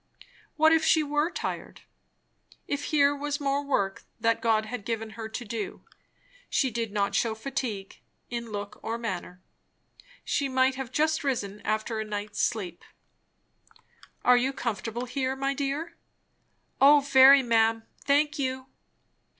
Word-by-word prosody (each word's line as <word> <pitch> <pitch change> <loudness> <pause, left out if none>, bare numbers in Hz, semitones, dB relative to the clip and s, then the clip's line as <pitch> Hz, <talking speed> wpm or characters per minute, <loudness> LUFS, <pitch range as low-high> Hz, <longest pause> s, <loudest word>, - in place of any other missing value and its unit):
What 315 +1 +5
if 325 -1 +3
she 315 -1 +4
were 295 +2 0
tired? - - -5 0.9
if 285 0 -2
here 290 -1 +3
was 290 +1 -3
more 280 0 0
work 200 -9 -1 0.2
that 230 0 +1
God 220 -1 +2
had 220 -1 -6
given 225 0 -3
her 220 0 -7
to 240 +2 -6
do. 220 -2 -5 0.7
She 265 -3 +1
did 230 -1 -3
not 200 -1 0
shew 225 -2 +1
fatigue, 225 -5 -5 0.3
in 235 -2 -5
look 205 -1 -6
or 225 +1 -3
manner. 185 -5 -5 0.8
She 280 -1 0
might 260 0 +3
have 260 -2 -6
just 310 +2 +1
risen 210 -7 -2
after 220 +1 -2
a - - -1
night's 210 0 -4
sleep. 190 -7 -2 1.4
"Are 250 0 +7
you 260 +3 +1
comfortable 235 -1 -3
here, 260 +1 -2
my 275 +1 -1
dear?" 285 +4 -3 0.8
"O 290 +1 +8
very, 275 0 +7
ma'am, 225 -1 +2 0.2
thank 290 +1 +2
you." 260 -1 -2
245 Hz, 140 wpm, -27 LUFS, 220-280 Hz, 1.4 s, O